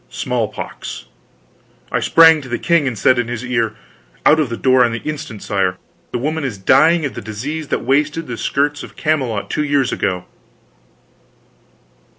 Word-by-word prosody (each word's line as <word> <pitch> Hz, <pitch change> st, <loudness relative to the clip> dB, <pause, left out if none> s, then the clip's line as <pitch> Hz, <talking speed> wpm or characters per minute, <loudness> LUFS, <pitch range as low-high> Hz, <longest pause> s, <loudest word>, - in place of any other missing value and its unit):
Smallpox! -, -, -4 dB, 0.9 s
I -, -, +1 dB
sprang 160 Hz, -1 st, +6 dB
to 130 Hz, -, -10 dB
the 120 Hz, -, -1 dB
king, 170 Hz, -5 st, +2 dB
and 120 Hz, -4 st, -3 dB
said 125 Hz, +5 st, +3 dB
in 120 Hz, -, -1 dB
his 120 Hz, 0 st, -5 dB
ear: 115 Hz, -3 st, -1 dB, 0.5 s
"Out 155 Hz, -, +6 dB
of 150 Hz, -5 st, +1 dB
the 115 Hz, -, -4 dB
door 130 Hz, -1 st, +4 dB
on 120 Hz, -1 st, +1 dB
the 115 Hz, -, -4 dB
instant, 150 Hz, -8 st, -6 dB
sire! 95 Hz, -2 st, 0 dB, 0.3 s
the -, -, -1 dB
woman 155 Hz, +5 st, -2 dB
is 125 Hz, -7 st, -3 dB
dying 155 Hz, -, +4 dB
of 140 Hz, -, -3 dB
that -, -, -7 dB
disease 140 Hz, +9 st, -5 dB
that -, -, -2 dB
wasted 150 Hz, +5 st, +1 dB
the 120 Hz, -, -5 dB
skirts 145 Hz, +5 st, -1 dB
of -, -, -11 dB
Camelot 130 Hz, -9 st, -1 dB
two 150 Hz, -, 0 dB
years 140 Hz, -3 st, +1 dB
ago." 90 Hz, -1 st, -2 dB
130 Hz, 170 wpm, -18 LUFS, 115-150 Hz, 0.9 s, sprang